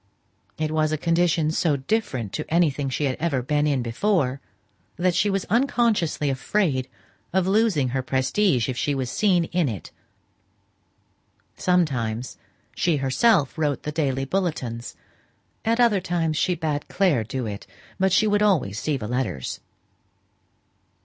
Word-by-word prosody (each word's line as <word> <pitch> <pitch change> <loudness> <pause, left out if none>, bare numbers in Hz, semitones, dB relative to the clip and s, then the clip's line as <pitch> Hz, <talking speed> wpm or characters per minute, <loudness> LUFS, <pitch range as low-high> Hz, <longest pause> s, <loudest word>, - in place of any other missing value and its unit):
It 155 0 -1
was 155 -1 +1
a 155 - 0
condition 165 -1 +1
so 160 -3 +1
different 130 - -2
to 155 - -5
anything 150 -5 +2
she 130 - -2
had 135 -3 0
ever 145 -7 0
been 150 +3 +1
in 135 -4 +1
before, 135 - 0 0.5
that 180 +1 +1
she 180 +4 +2
was 195 -1 -1
unconsciously 225 - +1
afraid 135 -2 0 0.4
of 190 0 +1
losing 190 - +2
her 130 +2 -1
prestige, 130 - +1
if 130 - -2
she 145 +3 -1
was 130 -2 -3
seen 185 -5 +2
in 165 -3 0
it. 105 -6 -7 1.6
Sometimes 130 -10 0 0.4
she 170 -2 +1
herself 140 - +2
wrote 145 -3 0
the 150 - -3
daily 135 -4 -1
bulletins; 135 -9 -3 0.7
at 230 +2 +1
other 225 -6 +4
times 165 -3 -1
she 180 +4 +1
bade 155 -3 -2
Clare 175 - +2
do 125 +3 -4
it, 100 -2 -6 0.3
but 190 0 +2
she 215 +4 +4
would 205 -1 +2
always 155 - +2
see 150 -3 -1
the 105 -4 -5
letters. 120 - -3
155 Hz, 145 wpm, -24 LUFS, 130-180 Hz, 1.6 s, other